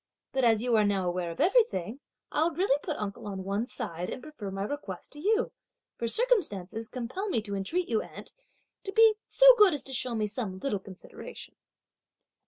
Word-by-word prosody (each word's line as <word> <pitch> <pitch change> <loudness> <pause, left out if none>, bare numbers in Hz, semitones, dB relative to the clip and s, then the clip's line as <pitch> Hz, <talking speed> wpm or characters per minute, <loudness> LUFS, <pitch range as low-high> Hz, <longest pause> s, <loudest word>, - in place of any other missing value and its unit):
But 265 - 0
as 225 -2 +4
you 245 -2 +2
are 215 - +4
now 195 -3 +1
aware 175 -1 -1
of 165 - -8
everything, 280 - +2 0.3
I'll 320 +3 +2
really 330 -3 +1
put 310 - -4
uncle 205 0 -5
on 190 -2 -5
one 200 +5 -2
side, 170 -4 -5
and - - -5
prefer 300 -10 -7
my 195 0 -3
request 205 -6 -6
to 295 - -9
you; 435 +7 +1 0.4
for 235 - -3
circumstances 225 - +2
compel 255 - -4
me 345 - +1
to 205 -2 -6
entreat 330 - -1
you, 225 -2 +1
aunt, - - -9 0.5
to 390 - -5
be 445 +1 +6
so - - +3
good 395 -6 +7
as 285 - -6
to 265 - -8
show 245 -1 -2
me 215 -1 0
some 205 -3 -4
little 205 0 -2
consideration!" 195 - -11
230 Hz, 190 wpm, -29 LUFS, 195-330 Hz, 0.5 s, good